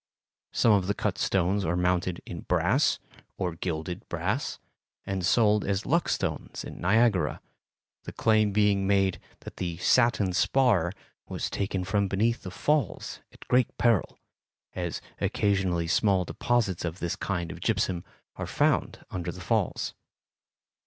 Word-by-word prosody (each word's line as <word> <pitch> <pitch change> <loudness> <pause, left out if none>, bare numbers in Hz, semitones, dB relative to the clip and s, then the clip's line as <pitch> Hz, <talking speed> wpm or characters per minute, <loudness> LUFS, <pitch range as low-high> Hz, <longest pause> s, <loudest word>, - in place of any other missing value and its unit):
Some 115 - +3
of 100 -3 +3
the 100 - 0
cut - - -2
stones 95 +2 +1
are 85 0 0
mounted 90 0 0
in 85 - -6
brass, 90 - +2 0.4
or 90 -2 -1
gilded 85 0 -4
brass, - - -2 0.5
and 95 -1 -2
sold 105 +2 +3
as 100 +1 -1
luck 170 +4 +1
stones - - -3
at - - -7
Niagara, 100 -4 +2 0.7
the - - -5
claim 110 -2 +3
being 100 -1 +2
made 95 -2 +2 0.2
that - - -10
the 85 -2 -3
"satin 105 -1 +3
spar" 100 -5 +3 0.4
was - - -3
taken 95 -2 -2
from 100 +2 +1
beneath 115 +5 +1
the 95 - -6
Falls 145 +8 -1
at - - -16
great 125 -1 +2
peril, 115 -6 +2 0.6
as 90 -2 -3 0.2
occasionally 95 -4 +1
small 95 +2 +2
deposits 110 -3 0
of 85 0 -3
this 85 -3 -2
kind 85 -3 -3
of 85 - -9
gypsum 95 -4 0 0.3
are - - -4
found - - 0
under 90 -1 -3
the - - -10
Falls. - - 0
95 Hz, 145 wpm, -28 LUFS, 90-105 Hz, 0.7 s, Some